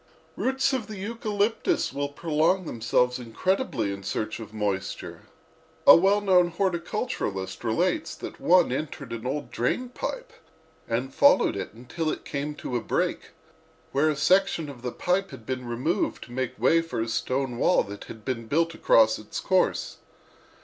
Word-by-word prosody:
"Roots 265 +1 +1
of 255 -5 -2
the 215 -2 -7
eucalyptus 215 +1 -1
will 140 0 -2
prolong 160 +5 +1
themselves 125 0 +1
incredibly 120 - -1
in 100 - -7
search 110 +3 -3
of 110 -2 -9
moisture. 105 -3 -3 0.6
A - - +11
well 195 +4 +4
known 185 -3 +4
horticulturist 170 - -2
relates 170 +11 0
that - - -8
one 180 -5 +5
entered 140 -2 -4
an 115 +1 -5
old 140 -2 -3
drain 245 - -1
pipe - - -5 0.5
and 125 +3 -2
followed - - +5
it - - -5
until 125 +7 -3
it - - -4
came 145 +1 -3
to 125 - -5
a 120 - 0
break, - - -1 0.6
where 145 +3 +3
a 155 - 0
section 170 +1 +2
of 130 -4 -10
the 125 0 -3
pipe 190 +6 0
had 110 - -11
been 130 0 -4
removed 140 - -1
to - - -14
make 130 0 -3
way 160 +9 +4
for 165 -8 -5
a 115 - -2
stone 125 +2 -1
wall 180 - +4
that 100 +1 -9
had 110 -1 -11
been 115 -4 -3
built 165 +5 +1
across 110 -7 +4
its 105 - -6
course. 185 -1 +1
145 Hz, 165 wpm, -26 LUFS, 120-185 Hz, 0.6 s, A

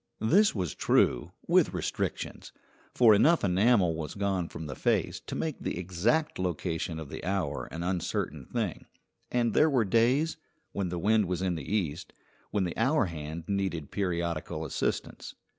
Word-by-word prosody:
This 185 - +4
was 90 -6 -2
true, - - +2
with - - +3
restrictions, - - -3 0.4
for 115 -3 +6
enough 155 +11 +4
enamel 95 -1 +3
was 80 -1 -5
gone 95 -4 -1
from 80 - -7
the 75 - -5
face - - 0
to - - -4
make 155 -3 -3
the - - -3
exact 95 - 0
location 85 -2 -2
of 80 -3 -7
the - - -7
hour 95 +1 -1
an 85 +1 -5
uncertain 85 -6 -2
thing; 110 -9 -3 0.4
and 120 -3 +1
there 155 - +5
were 125 -6 +2
days, 125 - +2 0.3
when 95 -3 -2
the 90 - -3
wind 105 +4 +3
was 90 +1 -2
in 90 -2 +1
the 80 0 -6
east, 90 -5 -2 0.4
when 100 -2 0
the 90 - -3
hour 130 +3 +3
hand 80 -1 -6
needed 95 -7 -2
periodical 85 -4 -2
assistance. 75 - -3
95 Hz, 160 wpm, -29 LUFS, 85-110 Hz, 0.4 s, for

